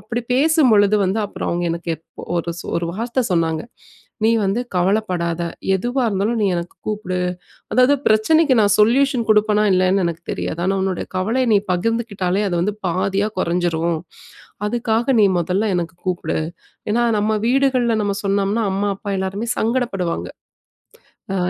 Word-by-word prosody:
அப்பிடி 240 Hz, +1 st, -4 dB
பேசும்பொழுது 255 Hz, -9 st, +4 dB
வந்து 190 Hz, +4 st, 0 dB
அப்புறம் -, -, -5 dB
அவுங்க 175 Hz, 0 st, -1 dB
எனக்கு 170 Hz, 0 st, -4 dB
எப் 165 Hz, -, -14 dB
ஒரு, 170 Hz, 0 st, -2 dB, 0.2 s
ஒரு 170 Hz, -, -1 dB
வார்த்த 235 Hz, +6 st, -1 dB
சொன்னாங்க, 165 Hz, -2 st, +1 dB, 0.6 s
"நீ 225 Hz, -, +5 dB
வந்து 195 Hz, +5 st, 0 dB, 0.2 s
கவலைப்படாத! 180 Hz, -3 st, 0 dB, 0.4 s
எதுவா 245 Hz, +7 st, -1 dB
இருந்தாலும், 210 Hz, +3 st, 0 dB
நீ -, -, +3 dB
எனக்கு 170 Hz, +1 st, -5 dB
கூப்பிடு! 205 Hz, -4 st, -2 dB, 0.5 s
அதாவது 255 Hz, +5 st, +4 dB
பிரச்சனைக்கு 265 Hz, +7 st, +4 dB
நான் 205 Hz, -2 st, +3 dB
சொல்யூஷன் 245 Hz, +2 st, +3 dB
குடுப்பனா, 210 Hz, 0 st, +4 dB
இல்லயான்னு 185 Hz, +1 st, +2 dB
எனக்கு 165 Hz, -1 st, -4 dB
தெரியாது. 165 Hz, -, -4 dB
ஆனா, 195 Hz, -, +1 dB
உன்னோட 190 Hz, -2 st, -2 dB
கவலைய 230 Hz, +7 st, 0 dB
நீ -, -, +6 dB
பகிர்ந்துக்கிட்டாலே, 200 Hz, -1 st, -1 dB
அது 175 Hz, -, -1 dB
வந்து 205 Hz, +3 st, -1 dB
பாதியா 195 Hz, +4 st, 0 dB
குறைஞ்சிரும். 170 Hz, -2 st, 0 dB, 0.7 s
அதுக்காக 235 Hz, +2 st, 0 dB
நீ -, -, +6 dB
மொதல்ல 190 Hz, +5 st, 0 dB
எனக்கு 170 Hz, -1 st, -3 dB
கூப்பிடு!" 180 Hz, -1 st, -1 dB, 0.5 s
ஏன்னா, 240 Hz, +2 st, +2 dB
நம்ப 215 Hz, +1 st, +1 dB
வீடுகள்ல 255 Hz, -3 st, +2 dB
நம்ப 200 Hz, -1 st, -1 dB
சொன்னம்ன்னா 200 Hz, +3 st, +1 dB
அம்மா, 200 Hz, +1 st, 0 dB
அப்பா 200 Hz, 0 st, -5 dB
எல்லாருமே 195 Hz, +5 st, -3 dB
சங்கடப்படுவாங்க. 220 Hz, -7 st, -1 dB, 1.1 s
அ -, -, 0 dB
205 Hz, 140 wpm, -20 LUFS, 180-230 Hz, 1.1 s, நீ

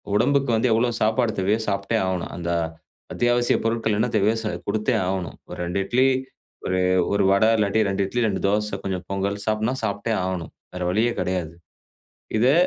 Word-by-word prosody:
உடம்புக்கு 140 Hz, +2 st, +2 dB
வந்து 115 Hz, +3 st, +2 dB
எவ்வளோ 120 Hz, +2 st, +2 dB
சாப்பாடு 110 Hz, +1 st, +2 dB
தேவையோ 105 Hz, +4 st, +2 dB
சாப்ட்டே 100 Hz, +3 st, 0 dB
ஆகணும். 90 Hz, -2 st, -2 dB
அந்த 85 Hz, 0 st, -3 dB, 0.6 s
அத்தியாவசியப் 120 Hz, -1 st, +2 dB
பொருட்கள் 115 Hz, -2 st, +1 dB
என்ன -, -, +2 dB
தேவையோ 110 Hz, +2 st, +3 dB
சா 110 Hz, -, -1 dB, 0.2 s
கொடுத்தே 110 Hz, +4 st, 0 dB
ஆகணும். 95 Hz, -2 st, -3 dB
ஒரு -, -, -7 dB
2 90 Hz, +3 st, -2 dB
இட்லி, 130 Hz, +5 st, +3 dB, 0.6 s
ஒரு 95 Hz, 0 st, 0 dB, 0.3 s
1 100 Hz, -1 st, +2 dB
வடை 105 Hz, +3 st, +4 dB
இல்லாட்டி 105 Hz, +1 st, +2 dB
2 95 Hz, 0 st, 0 dB
இட்லி, 120 Hz, +5 st, -1 dB
2 100 Hz, -3 st, -2 dB
தோசை, 105 Hz, 0 st, 0 dB
கொஞ்சம் 95 Hz, -2 st, -3 dB
பொங்கல் 100 Hz, +1 st, -2 dB
சாப்டுன்னா 110 Hz, +3 st, 0 dB
சாப்ட்டே 105 Hz, +1 st, -1 dB
ஆகணும். 90 Hz, -3 st, -4 dB, 0.2 s
வேற 90 Hz, -, -4 dB
வழியே 110 Hz, +5 st, +2 dB
கெடையாது. 90 Hz, -3 st, -2 dB, 0.8 s
இதை 125 Hz, +5 st, +4 dB
105 Hz, 165 wpm, -23 LUFS, 95-115 Hz, 0.8 s, வடை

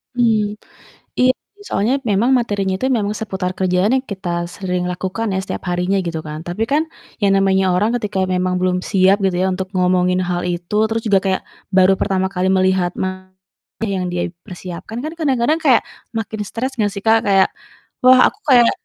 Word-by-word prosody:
Hmm, 215 Hz, -3 st, +1 dB, 0.6 s
iya 255 Hz, 0 st, +6 dB, 0.4 s
soalnya 220 Hz, +6 st, +1 dB
memang 215 Hz, +5 st, +2 dB
materinya 200 Hz, -5 st, -1 dB
itu 260 Hz, -, 0 dB
memang 220 Hz, -6 st, 0 dB
seputar 190 Hz, -4 st, -3 dB
kerjaan 185 Hz, +2 st, +1 dB
yang 260 Hz, -, -11 dB
kita 175 Hz, -3 st, -3 dB
sering 180 Hz, -2 st, -2 dB
lakukan 185 Hz, +5 st, -3 dB
ya -, -, 0 dB
setiap -, -, -5 dB
harinya 180 Hz, +2 st, 0 dB
gitu 165 Hz, -3 st, -4 dB
kan, 150 Hz, 0 st, -6 dB
tapi 175 Hz, +6 st, -2 dB
kan 310 Hz, +3 st, +2 dB, 0.3 s
yang 200 Hz, -1 st, +3 dB
namanya 195 Hz, 0 st, +3 dB
orang 210 Hz, +5 st, +2 dB
ketika 205 Hz, -4 st, -1 dB
memang 180 Hz, 0 st, 0 dB
belum 180 Hz, 0 st, +1 dB
siap 190 Hz, +1 st, +4 dB
gitu 190 Hz, -2 st, +1 dB
ya -, -, +2 dB
untuk 185 Hz, 0 st, -3 dB
ngomongin 180 Hz, 0 st, +2 dB
hal 175 Hz, 0 st, -2 dB
itu, 175 Hz, +2 st, -3 dB
terus 225 Hz, +1 st, -2 dB
juga 200 Hz, -3 st, +4 dB
kayak 190 Hz, -1 st, +1 dB, 0.3 s
baru 190 Hz, 0 st, +6 dB
pertama 190 Hz, -1 st, 0 dB
kali 185 Hz, 0 st, 0 dB
melihat 185 Hz, -1 st, +2 dB
materi 185 Hz, 0 st, -6 dB, 0.5 s
yang 180 Hz, -, -2 dB
dia 175 Hz, 0 st, -2 dB, 0.2 s
persiapkan, 185 Hz, +6 st, -7 dB
kan 310 Hz, -, -3 dB
kadang-kadang 280 Hz, 0 st, +1 dB
kayak 265 Hz, -7 st, +4 dB, 0.3 s
makin 220 Hz, -1 st, -4 dB
stres 245 Hz, +7 st, -3 dB
nggak 205 Hz, -1 st, +1 dB
sih 200 Hz, -, -6 dB
Kak, 225 Hz, 0 st, +5 dB
kayak 195 Hz, -1 st, +5 dB, 0.6 s
wah 255 Hz, 0 st, +7 dB
aku -, -, -25 dB
kayak 240 Hz, -3 st, +6 dB
190 Hz, 180 wpm, -19 LUFS, 180-220 Hz, 0.6 s, wah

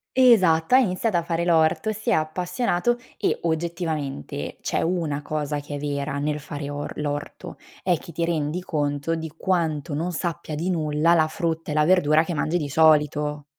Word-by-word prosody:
Esatto, 210 Hz, -7 st, +5 dB
ha -, -, +9 dB
iniziato 210 Hz, -3 st, +1 dB
a 170 Hz, -, +2 dB
fare 170 Hz, 0 st, -1 dB
l'orto, 165 Hz, +6 st, +2 dB
si 220 Hz, +3 st, -4 dB
è -, -, +4 dB
appassionato 180 Hz, +7 st, 0 dB, 0.2 s
e -, -, 0 dB
oggettivamente 160 Hz, -, -3 dB
c'è -, -, -1 dB
una 165 Hz, -4 st, -1 dB
cosa 150 Hz, -1 st, -3 dB
che 145 Hz, 0 st, -7 dB
è -, -, -4 dB
vera 140 Hz, 0 st, -2 dB
nel 150 Hz, +1 st, -1 dB
fare 145 Hz, 0 st, -6 dB
or 145 Hz, 0 st, -5 dB
l'orto, 145 Hz, -1 st, -4 dB, 0.3 s
è 180 Hz, -3 st, +2 dB
che 170 Hz, -, -11 dB
ti 165 Hz, +2 st, -1 dB
rendi 165 Hz, +1 st, -1 dB
conto 145 Hz, -1 st, -1 dB
di 160 Hz, -1 st, -5 dB
quanto 160 Hz, -5 st, -1 dB
non 170 Hz, +5 st, -1 dB
sappia 170 Hz, -1 st, -4 dB
di 165 Hz, +5 st, -2 dB
nulla 155 Hz, -1 st, +2 dB
la 155 Hz, -2 st, +3 dB
frutta 165 Hz, -3 st, -2 dB
e -, -, -1 dB
la 150 Hz, 0 st, +3 dB
verdura 160 Hz, -3 st, +4 dB
che 175 Hz, -, -3 dB
mangi 160 Hz, +3 st, 0 dB
di 150 Hz, -4 st, -2 dB
solito. 150 Hz, -1 st, +3 dB
160 Hz, 180 wpm, -24 LUFS, 150-175 Hz, 0.3 s, ha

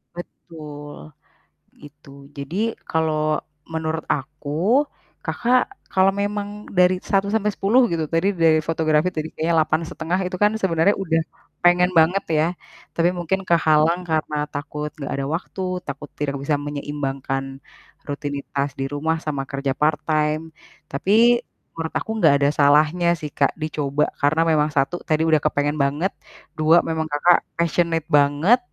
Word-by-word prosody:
Betul, 150 Hz, -, -10 dB, 0.7 s
itu. 145 Hz, 0 st, -16 dB, 0.3 s
Jadi 140 Hz, +5 st, -6 dB, 0.3 s
kalau 155 Hz, -1 st, +1 dB, 0.3 s
menurut 160 Hz, 0 st, -2 dB
aku, 155 Hz, -, 0 dB, 0.3 s
Kakak 250 Hz, +1 st, +1 dB, 0.2 s
kalau 190 Hz, +1 st, +3 dB
memang 205 Hz, +1 st, -3 dB
dari 180 Hz, -1 st, +4 dB
1-10 205 Hz, +3 st, +2 dB
gitu, 160 Hz, -2 st, -1 dB
tadi 165 Hz, +6 st, +1 dB
dari 165 Hz, -4 st, +3 dB
fotografi 160 Hz, +1 st, +1 dB
tadi 155 Hz, -2 st, -4 dB
kayaknya 165 Hz, +2 st, 0 dB
8,5 160 Hz, +3 st, -1 dB
itu 185 Hz, 0 st, -4 dB
kan 210 Hz, 0 st, +4 dB
sebenarnya, 190 Hz, -2 st, +2 dB
udah 165 Hz, -4 st, 0 dB, 0.4 s
pengen 180 Hz, +1 st, +4 dB
banget 175 Hz, +3 st, +3 dB
ya. 155 Hz, 0 st, +3 dB, 0.5 s
Tapi 170 Hz, +1 st, +3 dB
mungkin 180 Hz, +2 st, -2 dB
kehalang 165 Hz, +1 st, +2 dB
karena 155 Hz, -2 st, -1 dB
takut 150 Hz, +1 st, -5 dB
nggak 145 Hz, -4 st, -6 dB
ada 135 Hz, 0 st, -2 dB
waktu, 170 Hz, +4 st, -4 dB, 0.2 s
takut 140 Hz, +1 st, -7 dB
tidak 140 Hz, -1 st, -3 dB
bisa 140 Hz, +2 st, 0 dB
menyeimbangkan 140 Hz, -2 st, -4 dB, 0.5 s
rutinitas 145 Hz, -1 st, -3 dB
di 135 Hz, -, -1 dB
rumah 155 Hz, +3 st, -1 dB
sama 145 Hz, -4 st, -3 dB
kerja 140 Hz, 0 st, -3 dB
part 150 Hz, +1 st, +1 dB
time. 155 Hz, +1 st, 0 dB, 0.3 s
Tapi, 225 Hz, -, +3 dB, 0.3 s
menurut 165 Hz, -1 st, -4 dB
aku -, -, -9 dB
gak 150 Hz, -3 st, +6 dB
ada 140 Hz, -, +4 dB
salahnya 150 Hz, +4 st, +4 dB
sih 155 Hz, -2 st, -6 dB
Kak, 140 Hz, -1 st, +1 dB
dicoba. 150 Hz, -2 st, -1 dB
Karena 150 Hz, +3 st, +2 dB
memang 155 Hz, -1 st, +2 dB
1, 150 Hz, +4 st, -1 dB
tadi 155 Hz, -1 st, +1 dB
udah 160 Hz, -1 st, +5 dB
kepengen 145 Hz, -1 st, 0 dB
banget. 150 Hz, +6 st, 0 dB, 0.4 s
2, 160 Hz, +2 st, +5 dB
memang 160 Hz, -1 st, -2 dB
Kakak 170 Hz, +4 st, +4 dB, 0.2 s
passionate 170 Hz, -1 st, 0 dB
banget. 150 Hz, -, +4 dB
155 Hz, 135 wpm, -22 LUFS, 145-175 Hz, 0.7 s, gak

